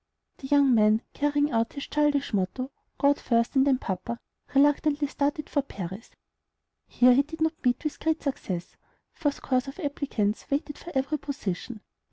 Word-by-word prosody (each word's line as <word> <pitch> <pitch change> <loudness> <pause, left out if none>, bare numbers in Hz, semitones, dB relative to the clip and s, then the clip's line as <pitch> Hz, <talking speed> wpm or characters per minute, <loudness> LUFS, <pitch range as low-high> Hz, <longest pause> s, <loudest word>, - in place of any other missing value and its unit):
The 265 - -8
young 280 -2 +5
man, 215 0 +4
carrying 290 0 +1
out 230 -1 0
his 280 - -5
childish 295 -3 +1
motto, 210 +7 -1 0.3
"God 285 0 +3
first, 235 +2 +1
and 265 +1 +4
then 265 -2 +4
papa," 195 +2 -4 0.4
reluctantly 290 +1 +3
started 290 +1 -1
for 285 - +1
Paris. 195 -4 -7 0.8
Here 250 0 +5
he 265 - +5
did 320 +3 -8
not 320 0 -1
meet 245 +2 +1
with 305 - -3
great 320 0 0
success, 185 - -4 0.4
for 310 -3 0
scores 260 -2 -1
of 275 +7 -8
applicants 280 - -1
waited 290 +1 -2
for 345 - -9
every 275 +3 0
position. 225 -5 -5
275 Hz, 165 wpm, -27 LUFS, 235-290 Hz, 0.8 s, young